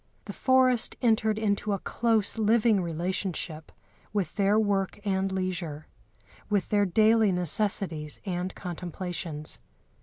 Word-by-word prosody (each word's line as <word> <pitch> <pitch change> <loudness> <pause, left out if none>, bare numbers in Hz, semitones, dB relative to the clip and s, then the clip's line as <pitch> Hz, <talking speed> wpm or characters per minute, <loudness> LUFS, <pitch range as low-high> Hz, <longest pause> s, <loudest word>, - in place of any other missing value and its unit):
The - - -6
forest 260 -2 +3
entered 220 -2 +2
into 205 -1 0
a - - 0
close 225 +1 0
living 220 -1 +3
relationship 170 -1 -3 0.4
with 200 -6 -2
their 200 0 +3
work 200 -3 0
and 195 -1 0
leisure, 180 -5 -3 0.6
with 205 -3 0
their 205 -1 +3
daily 220 +2 +4
necessities 180 -3 -1
and 180 -1 -3
contemplations. 175 -3 -5
195 Hz, 115 wpm, -27 LUFS, 180-215 Hz, 0.6 s, daily